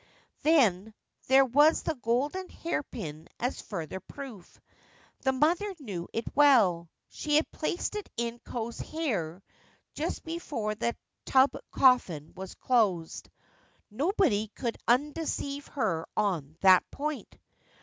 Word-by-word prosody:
Then, 220 - +3 0.3
there 270 +1 +6
was 290 +5 +4
the 325 - 0
golden 285 +9 -1
hairpin 165 - -5
as 245 +2 -2
further 175 -2 -5
proof. 230 -3 -11 0.6
The 265 - +2
mother 340 +9 +1
knew 195 - -5
it 230 - -3
well. 215 - +5 0.2
She 300 -1 -1
had 310 - +2
placed 345 +6 -2
it 420 - -5
in 235 0 -2
Ko's 235 -1 -5
hair 200 - -3 0.5
just - - -3
before 295 -10 -3
the 235 +2 -2 0.3
tub 265 +1 +5 0.2
coffin 185 - +3
was 190 0 -8
closed. 200 -10 0 0.6
Nobody 275 - +1
could 235 -3 -2
undeceive 285 +2 0
her 190 - -1
on 165 -7 -1
that 185 -1 +7
point. 300 0 -5
245 Hz, 120 wpm, -29 LUFS, 190-295 Hz, 0.6 s, that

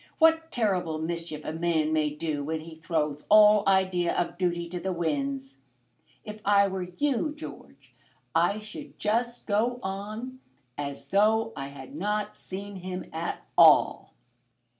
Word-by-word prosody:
What 325 0 +4
terrible 185 -9 0
mischief 165 -1 -4
a 155 - -3
man 160 -2 +1
may 155 -1 +2
do 150 -1 -3
when 160 +2 -3
he 165 +1 -10
throws 155 -3 -2
all 210 0 +8
idea 185 -2 +2
of 175 - -1
duty 175 -1 -1
to 180 +1 -4
the 190 +2 -2
winds! 140 -5 -2 0.7
If 210 0 -8
I 200 -1 +5
were 190 -2 -4
you, 295 +1 0
George, 310 - -11 0.4
I 205 - +3
should 215 0 -9
just 235 +3 -1
go 230 +4 +1
on 215 +7 -5 0.4
as 140 -1 -6
though 220 +3 +3
I 135 - -5
had 135 -1 -11
not 210 +6 -2
seen 200 +1 -7
him 185 0 -6
at 165 +1 -4
all." - - +5
185 Hz, 145 wpm, -27 LUFS, 160-210 Hz, 0.7 s, all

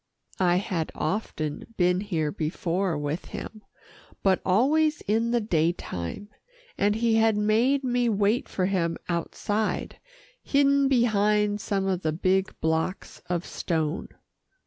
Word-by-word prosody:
I 175 -2 +3
had 180 -3 -1
often 155 +2 -3
been 180 0 +3
here 165 -7 -1
before 170 +3 -1
with 145 +3 -3
him, 215 - -8 0.6
but 190 -2 +3
always 300 +11 +2
in 225 +3 0
the 240 0 +2
daytime, 170 - -2 0.5
and 205 +1 +2
he 225 0 +2
had 225 -1 +3
made 230 +7 +2
me 245 -1 +1
wait 210 +2 +1
for 185 - -1
him 170 -3 0
outside, 205 +5 -2 0.4
hidden 280 0 +3
behind 210 -4 +2
some 195 -1 -1
of 185 -2 0
the 155 -2 0
big 190 +3 0
blocks 160 +4 -2
of 175 0 -1
stone. 160 -1 -2
200 Hz, 125 wpm, -26 LUFS, 170-225 Hz, 0.6 s, I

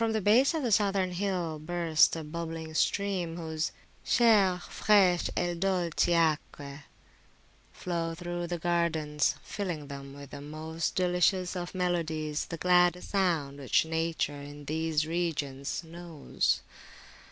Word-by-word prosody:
148] 220 -1 +1
the 210 +5 +6
base 275 - +1
of 310 - -1
the 240 - 0
Southern 195 -3 +2
hill 180 -4 -2
bursts 165 0 +2
a 165 - -5
bubbling 160 0 -6
stream, 180 -1 0
whose 160 -1 -3 0.3
Chaire, 210 -6 +4
fresche 190 -4 +3
e 175 0 0
dolci 175 -1 +1
acque 150 -3 -1 0.9
flow 165 -2 -3
through 175 0 -4
the 175 0 -2
gardens, 165 -3 0
filling 155 -1 -4
them 140 0 -8
with 140 -1 -11
the 140 - -8
most 155 +2 -4
delicious 180 +1 +2
of 175 +1 -5
melodies, 160 -4 -1
the 165 - -5
gladdest 180 0 +3
sound 165 -8 0
which 135 +3 +2
Nature 160 -3 -2
in 145 0 -10
these 155 0 0
regions 155 -4 -2
knows. 165 -2 -2
170 Hz, 130 wpm, -29 LUFS, 155-180 Hz, 0.9 s, the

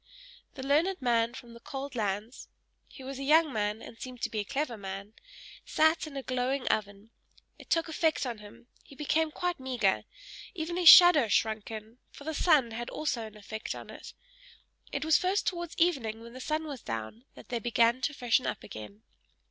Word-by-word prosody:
The 265 -3 -6
learned 330 +7 +2
man 235 -2 +1
from 240 -3 -11
the 235 - -12
cold 275 +3 -6
lands 215 +1 -3 0.4
he 265 - -13
was 270 0 -6
a - - -4
young 310 +1 +4
man, 210 0 -2
and 225 - -12
seemed 255 -2 -8
to - - -1
be 220 - -2
a - - 0
clever 270 +3 -2
man 195 0 -7 0.5
sat 315 +1 +2
in 280 -2 -8
a 270 - -4
glowing 255 +1 -1
oven; 205 +1 -2 0.5
it - - -14
took 330 0 +2
effect 320 -2 0
on 235 -4 -4
him, 210 +2 -14 0.2
he 275 - -15
became 310 +2 +1
quite 355 +2 -3
meagre 245 -7 0 0.5
even 335 0 -3
his 355 -2 +8
shadow 350 -9 +9
shrunk 220 0 0
in, 220 +2 -9
for - - -13
the 315 +2 -3
sun 295 -7 +3
had 235 +1 -5
also 255 -7 -2
an 215 0 -14
effect 215 +1 -6
on - - -9
it. - - -11 0.8
It - - -3
was 320 -1 +5
first 375 +3 0
towards 345 -2 -3
evening 255 -11 +1
when 235 +1 -11
the 255 - -9
sun 310 +3 -1
was 280 -5 -7
down, 115 - -6
that - - -14
they 240 - -1
began 235 +2 +2
to 290 - -1
freshen 245 0 +1
up - - -4
again. 105 0 -10
255 Hz, 195 wpm, -29 LUFS, 220-305 Hz, 0.8 s, shadow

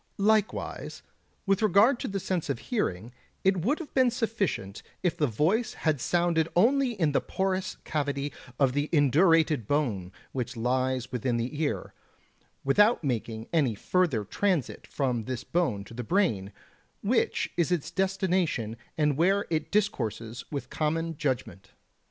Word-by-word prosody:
Likewise, 215 +1 0 0.4
with 195 0 +2
regard 215 +5 +5
to - - -3
the 195 0 -2
sense 180 -5 -2
of 140 - 0
hearing, 120 - -2 0.3
it 190 0 +3
would 280 - +2
have 330 - -9
been 260 -2 +4
sufficient 220 - -2 0.2
if 175 -2 +1
the 155 -4 +1
voice 185 - +1
had 155 -5 0
sounded 170 -1 +1
only 250 +7 +4
in 165 -8 +1
the 140 - +2
porous 190 0 -2
cavity 145 -2 -2 0.3
of 135 -3 +3
the 145 +2 -1
indurated 155 - +4
bone 110 -12 0 0.2
which 125 -1 -4
lies 130 +1 0
within 125 -1 -1
the 130 +6 -3
ear, 150 - -2 0.7
without 205 - +4
making 115 -4 -2
any 140 -9 +2
further 155 - +1
transit 175 - -1
from 125 -5 -1
this 130 0 -4
bone 130 - 0
to 110 - -13
the 125 +1 -5
brain, 110 - +1 0.5
which - - +1
is 170 0 +1
its 170 -2 -1
destination 185 - 0 0.2
and 150 -3 +2
where 195 +5 +3
it 155 -2 -1
discourses 120 - -1
with 140 -2 -5
common 165 +1 -1
judgement. 130 - -3
155 Hz, 145 wpm, -28 LUFS, 125-190 Hz, 0.7 s, regard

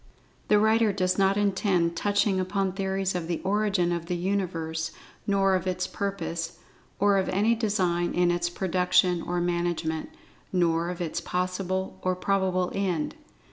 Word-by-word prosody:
The 210 - +5
writer 220 +1 +4
does 185 -1 0
not 195 +1 +3
intend 190 -4 +1
touching 205 +1 +1
upon 190 +1 0
theories 190 0 -1
of 175 -2 -3
the 170 -1 -2
origin 195 -3 +1
of 170 -1 -3
the 180 - -1
Universe, 170 -4 -2 0.4
nor 195 -1 +3
of 185 0 0
its 185 0 -1
purpose, 180 -5 -4 0.4
or 200 0 +3
of 190 - -1
any 210 +5 +3
design 185 -6 0
in 175 0 +3
its 175 0 0
production 180 -1 +2
or 175 +1 -2
management, 175 -2 -1 0.4
nor 170 -2 +1
of 180 0 -5
its 170 0 -2
possible 185 +2 -2
or 185 0 0
probable 185 -1 0
end. 185 -6 -1
185 Hz, 150 wpm, -27 LUFS, 175-195 Hz, 0.4 s, The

